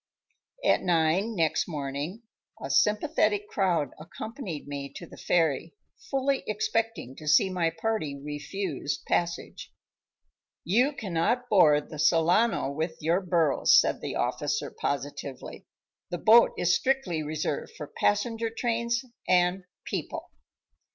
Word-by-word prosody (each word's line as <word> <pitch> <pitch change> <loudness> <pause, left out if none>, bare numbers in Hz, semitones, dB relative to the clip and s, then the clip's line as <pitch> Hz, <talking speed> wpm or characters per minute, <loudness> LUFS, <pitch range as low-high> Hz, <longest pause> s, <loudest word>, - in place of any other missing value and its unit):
At - - +4
nine 180 +5 +1
next 165 -4 +1
morning 150 - -4 0.4
a - - -5
sympathetic 210 -2 +2
crowd 175 -8 0
accompanied 175 - -7
me 140 -1 -5
to 170 - -7
the - - -13
ferry, 165 0 0 0.3
fully 275 0 +1
expecting 215 - -2
to 155 - -10
see 175 +6 +4
my 175 -3 +1
party 165 -6 -3
refused 150 +2 -4
passage. 170 0 -2 0.9
"You 245 - +2
cannot 220 +3 -1
board 150 -7 +4
the 155 - -7
Solano 165 +2 +3
with 160 +3 -3
your 170 +4 +1
burros," 170 -6 +4
said - - 0
the - - -4
officer, - - -1
positively; 140 -1 -5 0.4
"the 175 - -3
boat 225 +6 +6
is 175 0 +2
strictly 255 -12 0
reserved 150 -1 -3
for 150 - -5
passenger 225 - 0
trains 235 +2 -1 0.2
and 180 +1 +2 0.2
people." - - -5
175 Hz, 120 wpm, -27 LUFS, 155-220 Hz, 0.9 s, boat